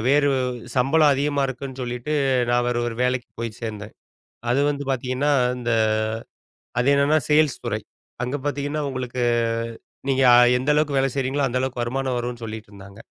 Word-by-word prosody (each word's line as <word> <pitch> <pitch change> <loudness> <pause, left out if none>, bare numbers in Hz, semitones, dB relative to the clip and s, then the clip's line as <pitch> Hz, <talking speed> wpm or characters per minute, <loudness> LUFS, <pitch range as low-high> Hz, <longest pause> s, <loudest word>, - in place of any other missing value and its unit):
வேறு 145 +1 +4 0.5
சம்பளம் 145 +4 +4
அதிகமா 140 +1 0
இருக்குன்னு 130 0 -6
சொல்லிட்டு, 125 +4 -4 0.4
நான் 120 0 +2
வேற 120 - -1
ஒரு 115 - -5
வேலைக்குப் 125 -2 -2
போய்ச் 115 -2 -5
சேர்ந்தேன். 105 -2 -6 0.6
அது 130 - +2
வந்து 145 -1 -2
பாத்தீங்கன்னா 130 +3 0 0.2
அந்த. 120 -1 -4 1.1
அது 125 - +1
என்னன்னா 140 +2 +3
சேல்ஸ் 150 -2 +3
துறை. - - -1 0.4
அங்க 125 +4 -2
பாத்தீங்கன்னா 145 +1 -2
உங்களுக்கு 125 -1 -4 0.9
நீங்க 135 0 +2 0.4
எந்த 130 +4 -1
அளவுக்கு 150 -2 +2
வேலை 135 0 +2
செய்யறீங்களோ, 135 +1 0
அந்த 125 +1 -1
அளவுக்கு 130 -2 -2
வருமானம் 130 +1 -1
வரும்னு 120 0 -5
சொல்லிட்டுருந்தாங்க. 105 -2 -9
130 Hz, 145 wpm, -23 LUFS, 120-140 Hz, 1.1 s, வேறு